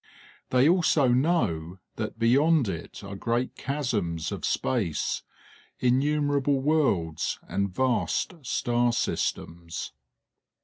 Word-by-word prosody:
They 130 +2 +4
also 165 -6 +4
know 120 - +1 0.2
that - - -4
beyond 135 +4 +4
it 85 +2 -6
are 100 0 -7
great 120 +5 -1
chasms 105 - -2
of - - -5
space, 100 - -1 0.6
innumerable 140 +2 +2
worlds, 130 - +1
and 100 0 -1
vast 130 - 0
star 120 -2 +1
systems. 85 -6 -3
125 Hz, 95 wpm, -27 LUFS, 95-145 Hz, 0.6 s, They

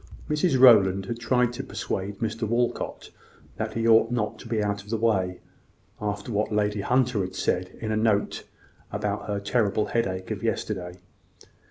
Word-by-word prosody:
Mrs 150 -2 +1
Rowland 100 -7 +6
had 115 +3 -4
tried 120 +1 +2
to - - -5
persuade 100 +1 -4
Mr 110 0 -2
Walcot 120 +2 -2 0.5
that - - -3
he 115 0 0
ought 115 0 +6
not 115 -4 -2
to - - -10
be 115 -1 -1
out 100 -1 -1
of 100 - -16
the 115 - 0
way, 95 -5 0 0.6
after 105 +2 -3
what 105 +1 0
Lady 105 -1 0
Hunter 125 -1 +2
had 95 0 -4
said 90 +1 -1
in 110 -1 -3
a 110 - +1
note 110 -2 +1 0.5
about 105 0 -3
her 100 -1 -1
terrible 105 0 +1
headache 95 -4 -2
of 105 -3 -3
yesterday. 95 -5 -3
105 Hz, 170 wpm, -26 LUFS, 100-115 Hz, 0.6 s, Rowland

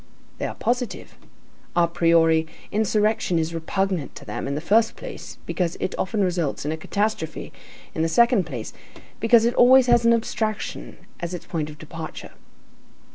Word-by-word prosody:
They - - -1
are - - -6
positive. 245 0 -2 0.6
A 175 -1 +4
priori, 165 -1 +3 0.2
insurrection 215 -3 +1
is 165 +1 -1
repugnant 180 -1 -2
to - - -10
them, - - -4
in 140 - -2
the - - -1
first 220 +7 +2
place, - - -9
because 175 -2 -2
it - - -2
often 205 +2 -1
results 175 -7 -1
in 150 - -1
a - - -1
catastrophe, 200 0 -3 0.4
in - - -2
the 165 - +1
second 235 0 +4
place, 125 -8 -6 0.5
because 230 0 +5
it 240 - +2
always 255 +1 +7
has 240 -1 +4
an 235 0 +5
abstraction 220 -2 -3 0.2
as 175 +1 -4
its 175 - -9
point 155 -3 -3
of 150 - -11
departure. 160 +1 -8
180 Hz, 165 wpm, -23 LUFS, 160-225 Hz, 0.6 s, always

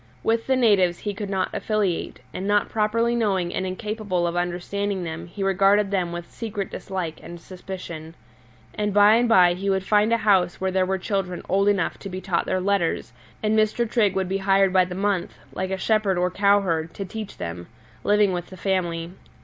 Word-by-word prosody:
With 225 0 0
the 265 - +3
natives 200 -8 +3
he 205 - -4
could 205 0 -5
not 190 -2 -1
affiliate, 205 - -1
and 190 - -4
not 205 0 +2
properly 230 +2 +1
knowing 190 -6 0
and 190 - -2
incapable 205 -2 -2
of 170 0 -2
understanding 180 +2 -2
them 165 0 -6
he 195 +3 -5
regarded 195 +1 +3
them 180 -3 0
with 175 0 -7
secret 210 -4 -5
dislike 180 -5 -5
and 170 +1 -9
suspicion. 170 -3 -8 0.6
And 210 -1 -2
by 205 +1 +7
and 240 0 +2
by 180 -5 +6
he 195 +3 -3
would 190 -1 +1
find 210 +2 +3
a 230 - +4
house 190 -5 +2
where 190 0 -1
there 185 0 +1
were 190 0 0
children 190 -2 -3
old 195 +2 +2
enough 200 -4 +1
to 195 - -7
be 185 0 -5
taught 185 -2 -1
their 185 - 0
letters, 185 - 0 0.3
and 215 0 +2
Mr. 215 +2 +2
Trigg 215 -4 +2
would 190 -1 0
be 195 +1 -1
hired 195 -1 +3
by 185 -1 +5
the 180 0 -7
month, 195 -2 -1 0.2
like 185 0 -3
a 190 - -2
shepherd 210 -2 +1
or 180 +1 +1
cowherd, 185 -5 +1
to 195 - -4
teach 215 +2 -7
them, 85 0 -6 0.4
living 205 -2 +3
with 175 -1 -4
the 185 - -12
family. 175 -3 -1
190 Hz, 200 wpm, -24 LUFS, 180-205 Hz, 0.6 s, by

